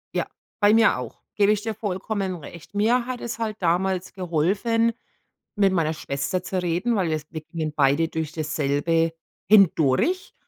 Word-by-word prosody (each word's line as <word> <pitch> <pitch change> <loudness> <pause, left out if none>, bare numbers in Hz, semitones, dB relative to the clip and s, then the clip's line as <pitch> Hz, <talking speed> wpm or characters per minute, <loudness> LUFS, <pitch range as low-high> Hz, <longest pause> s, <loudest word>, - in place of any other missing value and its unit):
Ja, - - +1 0.4
bei 205 +1 +6
mir 225 0 +5
auch. - - -8
Gebe 205 0 +4
ich 210 -1 +1
dir 225 0 -3
vollkommen 195 -1 -3
recht. 165 +4 -12
Mir 235 +4 +2
hat 255 -1 -4
es 235 - -5
halt 220 -2 -3
damals 180 +1 0
geholfen, 195 +7 +1 0.6
mit 195 -2 +4
meiner 160 -3 +1
Schwester 150 +5 -3
zu 185 -1 -2
reden, 180 +7 0
weil 180 -4 +1 0.2
wir 155 - -5
gingen 155 -1 -4
beide 145 +3 +2
durch 160 0 -4
dasselbe 155 +1 0 0.4
hindurch, 195 - +3
185 Hz, 155 wpm, -24 LUFS, 160-210 Hz, 0.6 s, bei